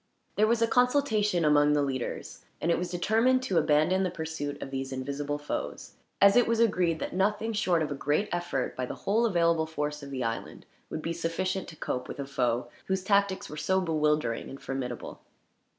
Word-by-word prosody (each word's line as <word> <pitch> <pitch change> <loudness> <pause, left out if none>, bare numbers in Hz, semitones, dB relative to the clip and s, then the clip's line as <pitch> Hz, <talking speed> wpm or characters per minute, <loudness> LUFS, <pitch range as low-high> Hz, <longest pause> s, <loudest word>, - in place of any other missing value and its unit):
There 215 +1 +4
was 230 0 +2
a - - +3
consultation 225 - +2
among 150 0 +5
the 145 -1 +2
leaders, 130 -3 -4 0.2
and 170 - +1
it - - +2
was 180 - -3
determined 225 +8 +2
to 190 -9 +2
abandon 155 +5 +3
the 185 - +1
pursuit 160 -4 -5
of 135 - -7
these 135 0 -3
invisible 140 +2 -3
foes, 145 0 -5 0.3
as 200 0 +7
it 245 - +5
was 230 0 +1
agreed 180 -7 +2
that - - -5
nothing, 210 +4 0
short 180 -6 +2
of 150 - -3
a - - 0
great 145 +8 0
effort 175 -7 -2
by 130 -1 -3
the - - -5
whole 225 +4 +3
available 170 -4 +2
force 150 -1 -3
of 140 - -8
the 130 -2 -3
island, 115 0 -4 0.2
would 155 - -5
be 165 - -2
sufficient 170 +3 -2
to 155 - -10
cope 125 -4 -3
with - - -7
a 140 - -3
foe 125 -3 0 0.2
whose 190 -1 0
tactics 200 -1 +2
were 150 - -8
so 190 +4 +1
bewildering 150 -8 0
and 135 - -9
formidable. 125 -3 -5
165 Hz, 200 wpm, -28 LUFS, 145-195 Hz, 0.3 s, as